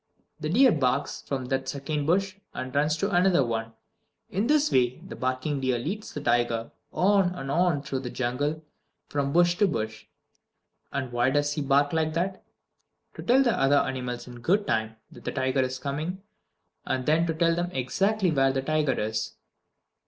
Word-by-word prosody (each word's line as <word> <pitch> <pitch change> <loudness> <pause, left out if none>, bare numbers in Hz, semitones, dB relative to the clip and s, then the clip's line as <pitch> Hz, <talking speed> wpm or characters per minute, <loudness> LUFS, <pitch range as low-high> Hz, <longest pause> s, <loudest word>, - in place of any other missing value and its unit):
The 155 -1 -3
deer 250 +8 +6
barks 130 -1 0
from 135 -2 -4
that 135 0 -1
second 145 +1 -3
bush 190 +2 +1 0.2
and 130 0 -5
runs 150 +2 +2
to 200 +4 -1
another 175 -5 +4
one. 115 -1 -3 0.6
In 200 +5 0
this 300 +1 +3
way 125 -1 +2
the - - -10
barking 130 +3 -2
deer 130 -2 +1
leads 195 - -4
the 145 - -6
tiger 120 -2 +1 0.2
on 190 -1 +3
and 135 -4 -5
on 170 -3 +2
through 135 -2 -3
the 125 -2 -5
jungle 145 +6 -2 0.5
from 140 -1 -1
bush 175 +2 +4
to 205 - +5
bush. 110 - -4 0.8
And 130 -3 -3
why 120 +1 +2
does 145 +1 +1
he 150 - -2
bark 140 +1 +2
like 160 -1 +1
that? 185 +3 -2 0.7
To - - -8
tell 260 +3 +4
the 240 -4 +2
other 135 +1 +3
animals 125 -3 -2
in 120 -1 -10
good 195 - +2
time 110 - -1 0.2
that - - -14
the - - -3
tiger 130 0 +1
is 130 0 -2
coming, 155 +8 -4 0.6
and 130 -1 -2
then 160 +4 +3
to 165 - 0
tell 165 +1 +3
them 175 +1 -1
exactly 190 - 0
where 135 -2 +3
the 135 0 -2
tiger 155 -2 +1
is. 110 +1 -2
145 Hz, 180 wpm, -27 LUFS, 130-175 Hz, 0.8 s, deer